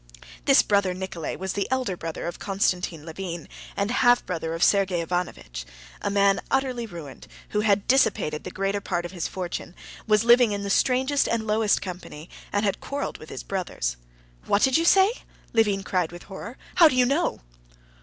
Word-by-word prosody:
This - - +6
brother 200 -3 +1
Nikolay 185 -3 -4
was 190 0 -4
the 200 0 -1
elder 255 -7 0
brother 165 -2 -5
of 175 - -5
Konstantin 180 -5 -1
Levin, 170 0 -6 0.3
and 200 +3 0
half 245 0 +4
brother 165 -2 -3
of 165 - 0
Sergey 195 -3 +3
Ivanovitch; 165 - -3 0.4
a - - -1
man 200 -1 +3
utterly 255 -3 0
ruined, 165 -8 -10 0.2
who 210 - 0
had 205 -2 +2
dissipated 215 - +2
the - - -5
greater 195 +1 -2
part 175 -3 -2
of 175 - -6
his 175 -3 -3
fortune, 180 -1 -5 0.3
was 215 0 +4
living 240 -2 +6
in 200 0 -3
the 200 - -2
strangest 265 +4 +2
and 230 -1 -1
lowest 215 0 +2
company, 175 -3 -8 0.2
and 205 +1 +1
had 200 - -1
quarreled 280 0 -4
with 155 - -12
his - - -7
brothers. 175 - -3 0.5
"What 200 - +3
did 265 -1 +4
you 330 - +3
say?" 385 +4 +6 0.4
Levin 210 -4 +2
cried 180 -4 -1
with 175 0 -10
horror. 205 +5 -9 0.2
"How 335 - +9
do 295 - 0
you 250 -1 +5
know?" 280 - 0
200 Hz, 185 wpm, -25 LUFS, 175-230 Hz, 0.5 s, How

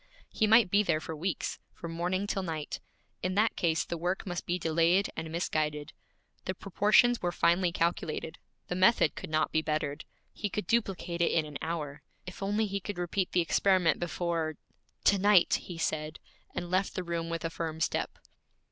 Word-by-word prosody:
He 215 - +2
might 220 -3 +6
be 205 - +5
there 155 -6 +1
for 160 0 -6
weeks, 175 +4 -3 0.2
from 170 - -7
morning 180 +4 -1
till 200 -1 -1
night. 160 -4 -4 0.4
In 185 +1 -1
that 215 +2 +3
case 165 -2 +1
the 170 - -4
work 180 +3 -1
must 175 -3 -4
be 175 - +1
delayed 170 +3 +2
and 160 0 -5
misguided. 150 -3 -1 0.5
The 185 - -2
proportions 210 +6 +3
were 175 - 0
finely 175 +1 +3
calculated; 165 -2 -2 0.3
the - - -2
method 185 -2 +4
could - - -7
not 155 0 +1
be 160 - +2
bettered. 155 -1 -2 0.3
He 210 - -3
could 210 0 -3
duplicate 185 -5 0
it 170 - +3
in 160 -2 +2
an 150 -2 -7
hour. 155 -4 -4 0.2
If 180 - -9
only 205 +3 +1
he 200 -1 -2
could 200 0 -6
repeat 180 +2 -1
the 180 - +3
experiment 185 0 +3
before 170 -2 -2 0.5
'To 200 - +5
night!' 200 -2 +5
he 175 - -8
said, 155 -1 -2 0.4
and 175 0 -4
left 185 +1 +1
the 185 - -2
room 170 -1 -3
with 165 0 -3
a 165 - -2
firm 160 -1 -4
step. - - -1
175 Hz, 185 wpm, -30 LUFS, 160-190 Hz, 0.5 s, might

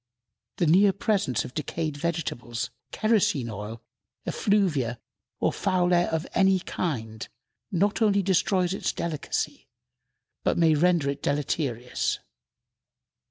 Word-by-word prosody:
The 175 - +2
near 190 +5 +5
presence 200 - 0
of 125 - -9
decayed 155 0 -3
vegetables, 145 -7 -3 0.2
kerosene 190 - +1
oil, 110 +3 -7 0.4
effluvia, 150 - +1 0.4
or - - +1
foul 180 -2 +1
air 175 0 +4
of 160 +1 -1
any 190 0 +4
kind, 115 -12 -4 0.4
not 200 +5 +1
only 200 -2 +4
destroys 185 -1 +2
its - - -1
delicacy, 165 -3 -3 0.8
but - - +1
may 165 -2 +5
render 170 -1 +3
it 140 0 -7
deleterious. 135 -4 -1
165 Hz, 115 wpm, -26 LUFS, 130-190 Hz, 0.8 s, near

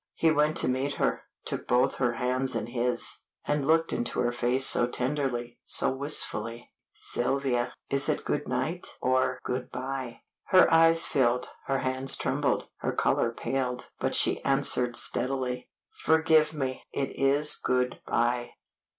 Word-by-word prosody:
He 160 - +2
went 155 +1 +1
to - - +3
meet 130 +3 -1
her, - - -1 0.2
took - - -5
both 125 +1 +2
her 120 -2 0
hands 130 +1 -1
in 115 - -2
his, 120 +1 -1 0.3
and 145 -2 -1
looked 165 +1 +2
into 120 - -2
her 120 -1 0
face 125 +2 +1
so 120 - +4
tenderly, 125 -2 -3
so - - +2
wistfully! 120 -5 -2 0.2
"Sylvia, 125 -1 -2 0.2
is 140 0 +3
it - - -1
good 145 0 -2
night 175 +3 -3
or 130 0 +1
good 125 0 -4
by?" 130 -2 -6 0.2
Her 185 -1 +5
eyes 165 0 +5
filled, 125 -2 +1 0.2
her 135 - 0
hands 130 +1 +2
trembled, - - -1
her - - -3
color 115 - +1
paled, 125 0 -4
but - - 0
she - - +4
answered 125 -1 +2
steadily 125 -1 -1 0.3
"Forgive 160 -1 +3
me; 135 -4 -4
it 135 -1 -3
is 140 +2 +4
good 125 -1 -1
by." 120 +1 -1
130 Hz, 150 wpm, -27 LUFS, 125-140 Hz, 0.3 s, Her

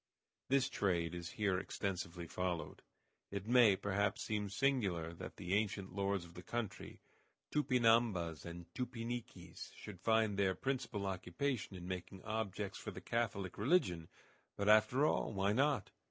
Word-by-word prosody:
_ - - -56
This 135 0 +4
trade 85 -9 0
is 85 -1 -5
here 100 -4 +1
extensively 90 -3 -3
followed. 90 0 -3 0.5
It 100 0 -4
may, 120 -3 +6
perhaps, 100 +3 0
seem 105 -2 -1
singular 100 -9 +1
that 85 - -8
the 90 -1 -3
ancient 100 -2 0
lords 100 -2 0
of 85 - -14
the 90 - -8
country, 115 +4 -4 0.5
Tupinambas 115 - +3
and 85 0 -7
Tupiniquis, 120 -1 -5
should 100 -4 -9
find 110 -3 +3
their 95 -2 +3
principal 130 -6 -2
occupation 95 +5 -2
in 90 -1 -7
making 95 +1 -5
objects 105 -2 -3
for - - -5
the - - -7
Catholic 100 -6 -2
religion. 100 - +2 0.5
But, 100 +1 +1
after 115 +6 +6
all, 130 - +1
why 100 +1 +2
not? 140 +4 +2
100 Hz, 145 wpm, -37 LUFS, 90-115 Hz, 0.5 s, may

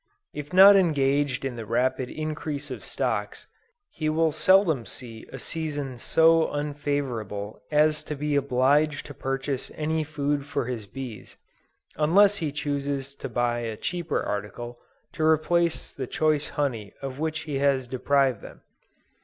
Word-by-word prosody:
If 145 0 -7
not 195 +2 +9
engaged 145 -6 +2
in 125 -3 -3
the 115 - -5
rapid 125 +2 0
increase 155 -2 -4
of - - -6
stocks, - - -3 0.5
he 155 -1 -2
will 160 +1 +2
seldom 165 - +4
see 115 -2 -11
a - - -6
season 145 -6 -4
so 165 +4 +4
unfavorable 140 -8 -3
as 150 0 +3
to 150 - -4
be 145 +1 -1
obliged 140 +2 +2
to 145 - -8
purchase 135 0 -3
any 155 +1 -1
food 145 -1 -1
for 135 - -2
his 115 -4 -5
bees, 125 -3 -8 0.6
unless 195 +7 +5
he 155 -5 -2
chooses 140 -1 -3
to - - -6
buy 120 0 0
a 115 -2 -4
cheaper 175 +1 -2
article, 120 +4 -5 0.3
to 160 - -3
replace 160 +2 +2
the 130 -2 -5
choice 155 -1 +1
honey 115 -8 -2
of 135 0 -5
which 160 0 -2
he 150 -4 -3
has 135 -2 +2
deprived 135 0 +1
them. - - -12
145 Hz, 145 wpm, -26 LUFS, 130-155 Hz, 0.6 s, not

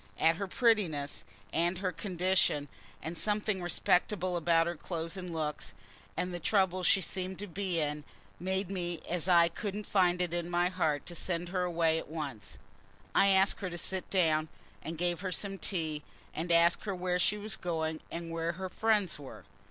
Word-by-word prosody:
And 165 +1 +3
her 200 - -2
prettiness, 185 - +1 0.3
and 175 +2 +1
her 185 0 -1
condition, 180 -5 +1 0.3
and 160 +2 -4
something 210 0 0
respectable 180 +1 +1
about 165 -1 +3
her 170 - -1
clothes 165 +1 -4
and 180 -2 -6
looks, 155 -2 -3 0.4
and 180 0 -1
the 175 - -3
trouble 185 0 +2
she 190 +2 +4
seemed 185 0 -3
to 205 - -4
be 185 -2 -2
in 150 -1 -1 0.4
made 190 +1 -1
me 175 -3 -2
as 175 0 -1
I 170 -2 +7
couldn't 205 +4 -4
find 180 -3 +3
in 175 -1 -1
my 175 +1 +2
heart 160 -6 0
to 175 - -6
send 175 0 -1
her 185 0 0
away 165 -2 +2
at - - -9
once. 140 -10 -6 0.6
I 195 - +5
asked 195 0 +4
her 185 - -2
to 175 - -6
sit 190 +2 -2
down, 160 -4 +2 0.3
and 165 0 -5
gave 175 +1 0
her 190 -2 -2
some 195 +2 -3
tea, 160 -5 -1 0.3
and 170 +2 -2
asked 170 +3 +4
her 200 -2 -1
where 180 0 0
she 210 +3 +2
was 210 -1 -3
going, 160 -3 -2
and 170 0 -5
where 165 0 -1
her 185 +2 -5
friends 210 -4 +1
were. 140 -2 -10
175 Hz, 185 wpm, -32 LUFS, 165-190 Hz, 0.6 s, I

